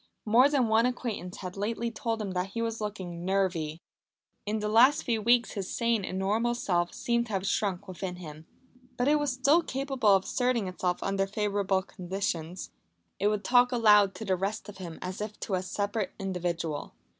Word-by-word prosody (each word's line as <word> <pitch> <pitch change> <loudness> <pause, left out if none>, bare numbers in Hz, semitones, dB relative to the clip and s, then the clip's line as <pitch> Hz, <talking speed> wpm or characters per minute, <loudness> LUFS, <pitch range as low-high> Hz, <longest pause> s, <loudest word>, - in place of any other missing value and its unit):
More 240 +6 +6
than 275 -5 +2
one 220 +2 +4
acquaintance 225 -7 -4
had 185 -1 -6
lately 230 +3 -2
told 225 -1 -2
him 195 - -4
that 185 +1 -3
he 230 - -1
was 225 -1 -3
looking 185 -5 -5
"nervy." 175 -4 -1 0.6
In 215 +1 0
the 210 0 -2
last 250 +8 +5
few 225 -3 0
weeks 240 +2 +3
his 195 -3 -4
sane 230 -3 +1
and 185 - -4
normal 220 +5 +1
self 175 -7 0
seemed 235 0 0
to 220 - -7
have 195 0 -1
shrunk 200 -1 -1
within 185 0 -5
him. 160 -2 -10 0.5
But 245 - +1
it 300 +1 +4
was 290 -2 0
still 280 +6 +4
capable 270 -6 -1
of 190 - +1
asserting 245 -4 0
itself 180 -1 -2
under 195 0 0
favourable 200 -2 0
conditions. 180 -2 -4 0.5
It 200 - +2
would 210 -1 0
talk 245 0 +4
aloud 210 -5 +5
to 220 - -6
the 190 -2 +2
rest 200 +4 -3
of 200 -2 -10
him 170 -3 -7
as 185 +3 -5
if 210 0 -5
to 200 - -3
a 185 - +1
separate 205 +2 -2
individual. 175 -5 -3
205 Hz, 190 wpm, -29 LUFS, 185-230 Hz, 0.6 s, More